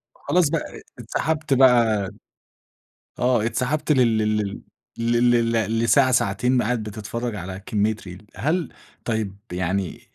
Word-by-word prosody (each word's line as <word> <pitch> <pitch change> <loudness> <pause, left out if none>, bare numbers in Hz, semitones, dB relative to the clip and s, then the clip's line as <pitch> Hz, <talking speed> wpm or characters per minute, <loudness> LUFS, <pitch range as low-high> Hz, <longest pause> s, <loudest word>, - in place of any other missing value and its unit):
خلاص 175 -4 +1
بَقى، 165 -1 -4 0.2
اتسحبت 155 -1 -1
بَقى 115 -6 +4 1.1
آه 120 -3 +2
اتسحبت 145 +6 0
لل 120 -5 +3
لل 105 -2 -1 0.7
لل 115 -2 +1
لساعة، 130 +2 +4
ساعتين 125 +3 +2
قاعد 115 0 -1
بتتفرّج 110 +2 -5
على 95 +1 -6
كمية 110 +1 +1
reel، 95 0 -11
هل 165 +4 -1 0.3
طيب 110 -4 -2 0.2
يعني 95 +1 -2
115 Hz, 110 wpm, -23 LUFS, 105-130 Hz, 1.1 s, بَقى